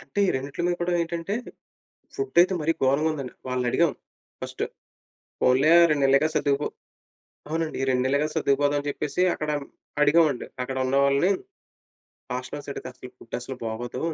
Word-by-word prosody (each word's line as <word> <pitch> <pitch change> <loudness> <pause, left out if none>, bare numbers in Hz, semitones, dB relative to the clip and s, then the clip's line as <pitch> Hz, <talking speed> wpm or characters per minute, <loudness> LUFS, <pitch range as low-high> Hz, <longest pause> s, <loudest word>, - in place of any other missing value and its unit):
అంటే - - -8
ఈ - - -1
రెండిట్లలో 145 +7 -2
కూడా 175 +1 0
ఏంటంటే, 170 +4 -2 0.8
ఫుడ్ 405 - -4
అయితే 185 +1 +3
మరి 160 +2 +2
గోరంగా 140 +4 +3
ఉందండి. 135 -4 -6
వాళ్ళని 125 -1 -1
అడిగాం 170 -4 +3 0.5
ఫస్ట్. - - -4 0.8
పోన్లే 135 +5 +4 0.2
2 145 -2 +2
నెల్లేగా 140 +3 +4
సర్దుకుపో 140 0 +1 0.8
అవునండి. 160 0 -2
ఈ - - +2
2 125 0 +2
నెల్లేగా 140 +3 +1
సర్దుకుపోదాం 145 -1 +2
అని 145 - -5
చెప్పేసి 150 +5 -2
అక్కడ 155 0 -3 0.5
అడిగామండి, 150 -3 +3 0.2
అక్కడ 130 +1 -4
ఉన్నవాళ్ళని. 140 +6 +3 1.0
హాస్ట్లర్స్ 130 +3 -5
అడిగితే 125 -1 -8
ఫుడ్ 115 - -7
అస్సలు 130 +1 -6
బాగోదు 115 +2 -4
145 Hz, 140 wpm, -25 LUFS, 130-160 Hz, 1.0 s, పోన్లే